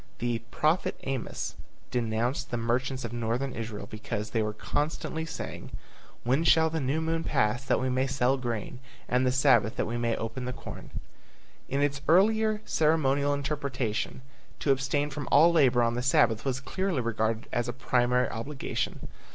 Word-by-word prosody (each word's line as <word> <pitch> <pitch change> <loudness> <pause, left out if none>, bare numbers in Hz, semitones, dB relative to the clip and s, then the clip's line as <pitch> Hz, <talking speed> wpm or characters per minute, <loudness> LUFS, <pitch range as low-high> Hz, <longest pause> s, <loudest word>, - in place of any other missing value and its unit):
The 120 -1 -1
prophet 155 +7 +1
Amos 135 -3 -3 0.4
denounced 120 +3 -1
the 120 - -2
merchants 125 +2 -1
of 115 - -5
Northern 120 +3 -1
Israel 110 -3 -5
because 105 0 -5
they 115 - +1
were 105 0 -1
constantly 155 +7 -2
saying, - - -6 0.5
When 130 +6 +2
shall 160 -1 +5
the 160 - -1
new 140 +3 0
moon 165 0 -1
pass 120 -3 +1
that - - +2
we 130 - 0
may 130 +1 +1
sell 135 -1 +2
grain, 120 0 -4 0.3
And 125 +1 +2
the - - +3
Sabbath 130 -4 +4
that - - 0
we 120 - -3
may 115 -1 +1
open 115 +3 -4
the 125 - -3
corn? - - -9 0.8
In 140 +1 0
its 140 -1 0
earlier 215 +5 +4
ceremonial 145 -3 +2
interpretation, 140 -5 -2 0.4
to 140 - +3
abstain 135 +2 0
from 145 -1 -5
all 165 +4 +7
labor 130 -7 +4
on 115 0 +2
the 120 - -1
Sabbath 120 -3 +3
was 135 -1 0
clearly 185 +1 -1
regarded 115 -1 -1
as 120 0 0
a - - -1
primary 125 0 +1
obligation. 135 +5 -4
130 Hz, 165 wpm, -28 LUFS, 120-145 Hz, 0.8 s, all